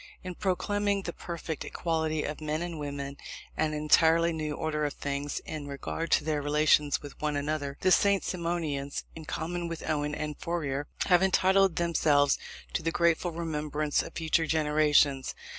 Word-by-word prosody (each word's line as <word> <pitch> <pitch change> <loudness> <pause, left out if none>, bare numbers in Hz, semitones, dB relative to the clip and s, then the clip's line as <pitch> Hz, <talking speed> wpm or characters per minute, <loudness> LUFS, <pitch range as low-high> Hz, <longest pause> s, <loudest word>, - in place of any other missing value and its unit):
In 185 -1 -5
proclaiming 200 +2 0
the 170 - -4
perfect 170 -2 -5
equality 160 -2 -1
of 150 +1 -5
men 155 +2 -2
and 170 -3 -5
women, 140 -1 -5 0.4
and 155 -1 0
an - - -2
entirely 165 +2 +4
new 155 -2 -3
order 150 -1 -2
of 145 - -1
things 140 0 -3
in 150 -2 -6
regard 145 +4 -4
to - - +4
their 150 -1 0
relations 150 0 +3
with 145 - -10
one 150 -1 0
another, 145 -1 -2
the 185 - +3
St. 200 +1 +4
Simonians, 165 -6 -2
in 160 -1 -9
common 170 +2 -3
with 165 -1 -6
Owen 150 -1 0
and 150 -1 -4
Fourier, 145 -5 -2 0.2
have 180 -2 +5
entitled 190 -1 +4
themselves 150 -4 +3 0.3
to - - 0
the 165 - 0
grateful 170 +1 +2
remembrance 150 -2 -1
of - - -9
future 160 0 +1
generations. 150 -3 +3
155 Hz, 165 wpm, -29 LUFS, 145-170 Hz, 0.4 s, have